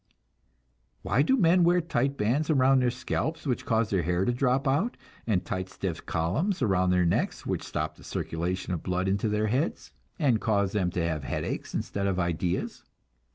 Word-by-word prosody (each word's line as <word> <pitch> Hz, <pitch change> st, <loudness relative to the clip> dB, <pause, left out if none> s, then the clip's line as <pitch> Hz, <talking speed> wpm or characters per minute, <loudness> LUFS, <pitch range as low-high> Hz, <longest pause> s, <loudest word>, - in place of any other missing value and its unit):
Why 135 Hz, -, +2 dB
do 265 Hz, -, +3 dB
men 180 Hz, -3 st, +4 dB
wear 175 Hz, +1 st, +4 dB
tight 140 Hz, -5 st, -1 dB
bands 130 Hz, +9 st, +1 dB
around 135 Hz, -2 st, +4 dB
their 125 Hz, -, +3 dB
scalps, 155 Hz, +6 st, -3 dB
which 125 Hz, -4 st, -2 dB
cause 110 Hz, -1 st, +1 dB
their 95 Hz, -3 st, +2 dB
hair 90 Hz, +3 st, 0 dB
to 120 Hz, -, +1 dB
drop 130 Hz, +2 st, +1 dB
out, 155 Hz, -, +1 dB, 0.3 s
and 100 Hz, -5 st, +1 dB
tight, 95 Hz, -1 st, -3 dB
stiff 90 Hz, -3 st, -5 dB
columns 130 Hz, -, 0 dB
around 95 Hz, -4 st, +2 dB
their 90 Hz, -1 st, +3 dB
necks, 85 Hz, -, 0 dB
which -, -, -1 dB
stop -, -, -4 dB
the -, -, -15 dB
circulation 90 Hz, +3 st, -3 dB
of 85 Hz, -, -3 dB
the -, -, -14 dB
blood 90 Hz, +1 st, 0 dB
into 100 Hz, +3 st, +1 dB
their 105 Hz, +1 st, +1 dB
heads, 130 Hz, +10 st, -1 dB, 0.2 s
and 130 Hz, -8 st, +2 dB
cause 100 Hz, -3 st, +1 dB
them 95 Hz, -4 st, 0 dB
to 85 Hz, -2 st, -1 dB
have 80 Hz, -3 st, -2 dB
headaches -, -, -4 dB
instead 100 Hz, 0 st, -2 dB
of 95 Hz, -1 st, 0 dB
ideas? 85 Hz, +1 st, -2 dB
105 Hz, 190 wpm, -28 LUFS, 90-135 Hz, 0.3 s, men